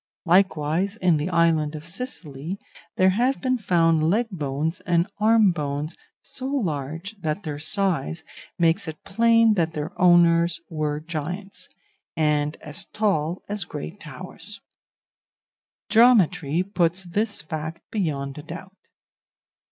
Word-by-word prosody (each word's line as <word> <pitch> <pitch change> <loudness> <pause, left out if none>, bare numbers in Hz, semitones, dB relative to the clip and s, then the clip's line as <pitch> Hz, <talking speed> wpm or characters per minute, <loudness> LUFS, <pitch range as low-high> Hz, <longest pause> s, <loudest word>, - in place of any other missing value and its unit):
Likewise, 175 +1 +2
in 180 -7 +2
the 150 +4 -2
island 165 -3 +2
of 155 0 -8
Sicily, 170 - -5 0.4
there 185 0 +4
have 245 +7 +1
been 255 -2 0
found 165 -5 +3
leg 225 +7 +2
bones 155 0 -2
and 170 -1 +1
arm 215 -2 +5
bones 150 -1 -3 0.3
so 260 -1 -4
large 170 - -3
that 160 +5 -2
their 150 -2 -4
size 165 -1 0 0.3
makes 165 -1 +2
it 155 -1 -7
plain 230 +2 +4
that 165 -4 0
their 150 -1 -4
owners 170 -1 +5
were 150 -2 -1
giants, 170 +5 -6 0.5
and 150 -1 +1
as 160 +6 -3
tall 180 -5 -1
as 205 -1 -2
great 75 - -7
towers; - - -8 1.3
geometry 195 - +4
puts 185 -2 0
this 205 +4 -1
fact 160 +1 -5
beyond 140 -9 -2
a - - -6
doubt. 175 +5 -9
170 Hz, 125 wpm, -24 LUFS, 155-195 Hz, 1.3 s, arm